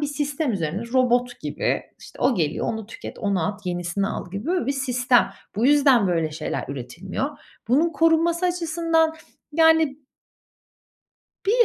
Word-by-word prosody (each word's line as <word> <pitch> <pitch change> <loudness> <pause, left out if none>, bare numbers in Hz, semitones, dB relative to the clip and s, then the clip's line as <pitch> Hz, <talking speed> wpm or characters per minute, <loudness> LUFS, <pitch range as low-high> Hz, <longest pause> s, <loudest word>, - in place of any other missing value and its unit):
bir 290 - 0
sistem 290 -1 -2
üzerine, 180 +2 -2
robot 245 -1 +2
gibi. - - -1 0.2
İşte, - - -14
o 255 0 +4
geliyor, 155 -6 -1
onu 220 -2 -3
tüket, 225 - -9
onu 195 -6 0
at, 205 -1 -5
yenisini 175 +2 -1
al 190 - -5
gibi 200 - -5
böyle 360 +1 0
bir 275 - +1
sistem. 250 -2 +2 0.3
Bu 230 - +2
yüzden 275 -7 +5
böyle 165 -3 0
şeyler 150 0 -4
üretilmiyor. 175 - -5 0.3
Bunun 320 +7 +3
korunması 330 +3 +3
açısından, 330 -2 +1 0.4
yani 320 -2 +4 1.5
bir 475 +4 +5
255 Hz, 145 wpm, -23 LUFS, 195-320 Hz, 1.5 s, yüzden